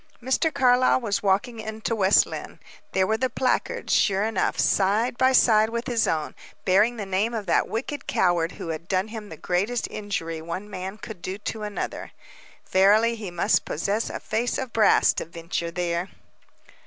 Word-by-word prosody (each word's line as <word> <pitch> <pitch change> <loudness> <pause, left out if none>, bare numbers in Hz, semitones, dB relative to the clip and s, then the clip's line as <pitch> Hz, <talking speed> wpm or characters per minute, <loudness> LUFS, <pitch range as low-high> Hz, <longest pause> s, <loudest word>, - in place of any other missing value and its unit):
Mr. 260 +6 +1
Carlyle 255 -1 +4
was 205 -5 -1
walking 210 +4 0
into 220 +1 -3
West 195 -2 +5
Lynne. - - -8 0.3
There 190 0 +2
were 220 +3 0
the 260 - +1
placards, 260 - -1
sure 195 0 +3
enough, 220 -2 0
side 210 +5 +2
by 260 +2 +3
side 220 -4 +5
with 235 +1 -3
his 240 -3 +1
own, 155 -2 -1 0.3
bearing 210 +6 +3
the 205 - -4
name 195 +5 0
of 215 -3 -3
that 170 - +2
wicked 270 +6 -4
coward 175 -2 +1
who - - -7
had 160 +1 -5
done 190 +2 0
him 215 -2 -8
the 160 - -9
greatest 200 +10 -1
injury 165 -6 -4
one 170 +5 -6
man 190 +2 -6
can 220 -4 -9
do 190 +1 -4
to 215 +1 -5
another. 210 -1 -5 0.6
Verily, 210 +5 +4
he 215 -4 -6
must 175 -1 +1
possess 200 +8 -2
a - - -5
face 230 +3 -1
of 260 -3 -5
brass 220 -2 +4
to - - -3
venture 170 +1 -4
there. 175 +1 -2
210 Hz, 180 wpm, -25 LUFS, 185-230 Hz, 0.6 s, West